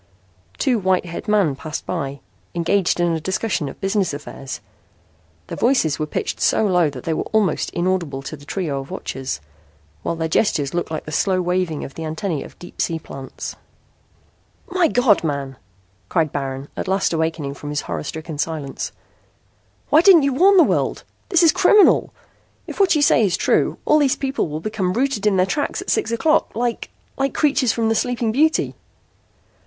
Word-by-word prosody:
Two 250 -5 +1
white 185 -2 +1
haired 170 -1 -7
men 200 -9 +2
passed 155 +2 -6
by, 140 -6 -4 0.3
engaged 175 +2 +1
in 175 -1 +2
a 160 -1 -1
discussion 190 -4 -1
of - - -11
business 195 -5 0
affairs. 135 -2 -7 0.9
Their - - -6
voices 235 - +2
were 155 - -1
pitched - - -3
so 220 - +3
low 180 -5 +3
that 130 -3 -9
they 165 - -1
were - - -2
almost 210 -6 +1
inaudible 175 -6 -1
to 145 - -6
the 145 - -15
trio 150 -3 -3
of 135 - -8
watchers, 130 - -5 0.6
while 170 - -2
their 160 0 -2
gestures 155 -5 +1
looked 175 0 -2
like 155 -1 -4
the 155 - -7
slow 185 +4 +1
waving 180 -3 -1
of 135 - -10
the 165 - -6
antennae 160 0 -3
of - - -13
deep 175 - -8
sea 165 - 0
plants. 135 -4 -8 1.2
"My 360 -2 +3
God, 245 - +3
man!" 140 -3 -3 0.5
cried 160 -4 +1
Baron, 135 0 -4
at - - -4
last 190 -1 +1
awakening 160 -3 -1
from 145 +1 -8
his 150 0 -1
horror 85 -3 -4
stricken 160 - -6
silence. 155 -3 -3 1.0
"Why 305 - +6
didn't 350 -4 +7
you 275 -1 +1
warn 385 +8 +5
the 350 - +8
world? - - 0 0.3
This 350 -2 +4
is 325 - +7
criminal. 420 -2 +5 0.5
If - - -8
what 390 -4 +4
you 295 - +3
say 240 - +5
is 180 -4 +1
true, - - +1
all 305 - +4
these 275 -3 +3
people 270 -6 -1
will 155 +1 -5
become 195 -2 -1
rooted 240 -3 0
in 200 -2 +3
their 185 - +4
tracks 290 +9 -2
at - - -3
six 435 - +1
o'clock 310 +4 +1
like 235 +1 -2 0.3
like 270 -1 -1
characters 280 -5 +2
from 225 0 0
'The 225 - +3
Sleeping 235 0 0
Beauty.'" 310 +7 +2
180 Hz, 185 wpm, -21 LUFS, 155-235 Hz, 1.2 s, the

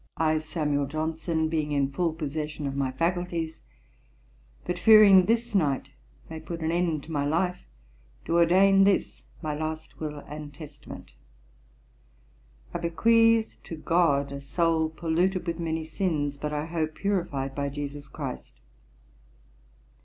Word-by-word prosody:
I, 155 0 +2
SAMUEL 150 -2 -1
JOHNSON, 160 +2 -1
being 155 -2 -1
in 140 -1 +1
full 170 +4 0
possession 150 -1 -4
of 135 -1 -3
my 135 -2 0
faculties, 165 +2 -2 1.0
but 175 0 -3
fearing 205 -3 +8
this 230 +1 +1
night 145 -9 0 0.4
may 160 0 -7
put 165 +1 -7
an 160 0 0
end 170 -4 0
to 165 - -10
my 145 -2 0
life, 170 - -1 0.6
do 170 - +1
ordain 195 +3 +5
this 195 0 +1 0.2
my 155 -1 -2
last 155 +1 -5
Will 150 -1 -4
and 150 0 -8
Testament. 145 -1 -11 1.6
I - - -2
bequeath 225 +6 +3
to 165 - -6
GOD, 155 -4 +1
a 140 0 -6
soul 160 +2 +1
polluted 170 +4 0
with 170 -1 -3
many 160 -1 -2
sins, 155 -3 -1
but 150 +1 -4
I 150 0 -2
hope 160 -1 -2
purified 170 -9 -2
by 140 0 -2
JESUS 145 0 -6
CHRIST. 140 -2 -7
160 Hz, 140 wpm, -27 LUFS, 145-175 Hz, 1.6 s, fearing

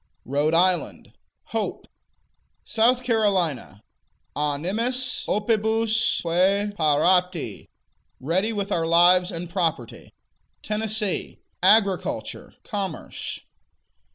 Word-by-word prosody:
Rhode 145 +4 0
Island 180 +1 0 0.4
Hope. - - -3 0.8
South 245 +3 +2
Carolina 185 - 0 0.5
Animis 210 - -1
opibusque 220 +2 +1 0.5
parati: 170 - +1 0.5
Ready 185 - 0
with 200 -2 -4
our 165 -3 0
lives 175 +2 +5
and 170 +1 -6
property. 160 - -3 0.5
Tennessee 215 -2 -2 0.2
Agriculture, 195 0 +1
Commerce. 195 -7 -5
185 Hz, 70 wpm, -24 LUFS, 165-220 Hz, 0.8 s, lives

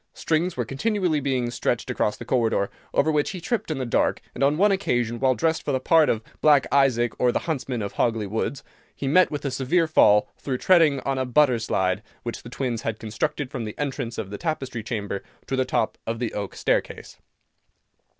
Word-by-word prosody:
Strings 165 +1 0
were 120 - -1
continually 180 - 0
being 130 -4 -1
stretched 120 +1 -1
across 105 -3 0
the - - -8
corridor, 115 -5 +1 0.2
over 155 - +2
which 150 -1 +1
he 185 - -5
tripped 220 +5 -2
in 155 - -2
the 130 - -2
dark, 120 - +1
and - - -2
on 145 +2 +3
one 205 +3 +4
occasion, 120 -11 0
while 130 -1 +3
dressed 160 +7 0
for - - -2
the 130 - +1
part 160 +3 +4
of 110 -1 0 0.2
"Black 145 -3 +5
Isaac, 125 -5 +3
or 125 -1 +3
the - - 0
Huntsman 130 -7 -2
of 100 - -5
Hogley 115 -3 0
Woods," 110 +7 -3 0.3
he 140 - -4
met 180 +6 +5
with 145 -1 -5
a 140 - -1
severe 140 +7 +1
fall, 105 -9 +5
through 130 -2 -2
treading 160 -5 +4
on 135 -1 -1
a 130 - 0
butter 125 -1 +3
slide, 95 -3 0 0.2
which 120 - -5
the 115 - -10
twins 120 -3 -3
had 110 -1 -3
constructed 125 +6 -3
from 125 - -4
the 105 -1 -7
entrance 135 -5 -3
of 100 -3 -5
the 100 - -6
Tapestry 135 -8 -3
Chamber 100 -3 -4 0.2
to 135 - -2
the 130 0 +1
top 110 - -1
of 115 +1 -2
the 120 -1 -3
oak 100 -1 -4
staircase. - - -2
130 Hz, 210 wpm, -24 LUFS, 115-150 Hz, 0.3 s, Black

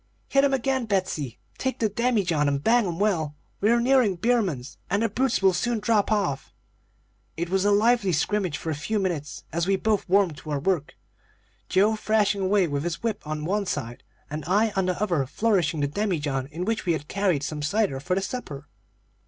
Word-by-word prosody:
"'Hit 275 0 +4
'em 280 - +3
again, 265 -1 0
Betsey! 185 - -2 0.2
Take 260 -1 -1
the 225 - +1
demijohn 200 -9 +1
and 140 0 0
bang 235 0 +4
'em 170 -2 -3
well. 170 -7 0 0.2
We 210 - +2
are 235 +1 +4
nearing 245 -5 +3
Beaman's, 185 - -1
and 200 +4 +1
the 225 - +1
brutes 245 0 0
will 190 -1 +5
soon 235 +6 0
drop 210 0 +1
off.' 180 -11 -1 0.8
"It 170 +1 -3
was 190 +1 +1
a 205 - +4
lively 210 -1 +3
scrimmage 180 -1 0
for 160 - -4
a - - 0
few 150 +10 -2
minutes, 170 -7 -3
as 170 +1 0
we 195 - +3
both 210 -1 0
warmed 190 -5 +3
to 155 - -10
our 145 -2 -1
work, 160 -1 -1 0.7
Joe 205 +4 +3
thrashing 210 -2 +1
away 190 -1 +2
with 145 -1 -2
his 170 +3 -4
whip 220 -3 -1
on 155 0 -3
one 200 +3 -1
side, 120 -7 -4 0.3
and 150 +1 -5
I 210 +4 +3
on 190 -1 +1
the 180 -1 -1
other 175 -10 0
flourishing 170 - +1
the 145 - +2
demijohn 145 -7 -1
in 165 +5 -5
which 225 -2 -2
we 170 - +3
had 150 -2 -4
carried 185 -7 0
some 150 +1 -4
cider 150 -2 0
for 180 +6 -1
the 195 - 0
supper. 150 - -6
190 Hz, 200 wpm, -25 LUFS, 155-215 Hz, 0.8 s, will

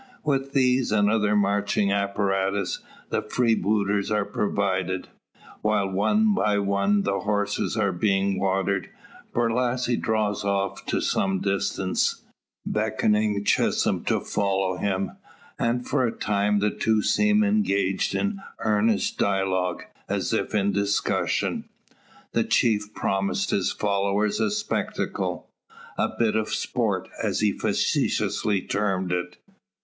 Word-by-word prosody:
With 135 -2 -1
these, 130 -3 +2
and 105 -1 +3
other 105 -1 +2
marching 100 0 +1
apparatus, 100 -1 0 0.3
the - - +1
freebooters 105 -4 +1
are 105 -1 +1
provided. 95 -3 -1 0.5
While 105 -2 +1
one 210 - +3
by 105 - +1
one 100 0 +1
the 100 0 0
horses 105 +1 -1
are 100 -3 +2
being 95 +1 +1
watered, 95 0 0 0.4
Borlasse 120 +1 0
draws 105 -2 0
off 100 0 -1
to - - 0
some 95 -1 0
distance, 95 -1 -1 0.4
beckoning 105 -1 +1
Chisholm - - +1
to - - +1
follow 95 -2 0
him; 95 0 -2 0.4
and 120 +1 0
for - - +1
a - - -1
time 105 -1 0
the 105 0 +2
two 110 -2 +1
seem 210 0 +3
engaged 150 - +1
in 200 -1 -1 0.2
earnest 110 0 +1
dialogue, 95 -2 0 0.3
as - - -1
if - - -1
in 100 -1 +2
discussion. 100 0 0 0.7
The - - +2
chief 105 -2 +1
promised 100 - -1
his 95 - +1
followers 100 0 0
a 220 - +2
spectacle, 210 +1 -2 0.5
a - - +1
"bit 115 -2 +2
of 110 -1 0
sport," - - -1
as - - 0
he - - +3
facetiously 100 -3 0
termed 95 -3 -1
it. 90 0 -2
100 Hz, 125 wpm, -25 LUFS, 100-110 Hz, 0.7 s, and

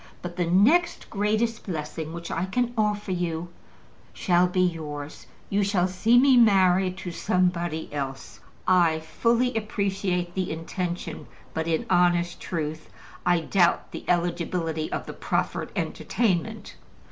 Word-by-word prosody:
"But 175 -1 -6
the 175 -2 0
next 250 - +3
greatest 215 +3 0
blessing 155 -2 -4
which 170 0 -7
I 165 +2 -1
can 245 +4 0
offer 210 -2 0
you 175 -1 -2 0.6
shall 180 -1 +3
be 185 +1 0
yours, 155 -4 -3 0.2
you 200 +1 +2
shall 195 -2 +2
see 215 +6 +3
me 260 0 +6
married 190 -4 +4
to 180 - -6
somebody 175 -3 0
else." 135 -2 -5 0.3
I 175 -4 +4
fully 235 +10 +1
appreciate 195 -5 -1
the 185 -1 -2
intention, 175 +2 -4 0.3
but 160 0 -2
in 160 -1 0
honest 175 -1 +2
truth, 155 -2 -4 0.4
I 175 -1 +4
doubt 175 +1 +2
the - - -7
eligibility 170 -2 -1
of - - -3
the - - -7
proffered - - -2
entertainment. 215 0 -1
180 Hz, 135 wpm, -26 LUFS, 170-200 Hz, 0.6 s, me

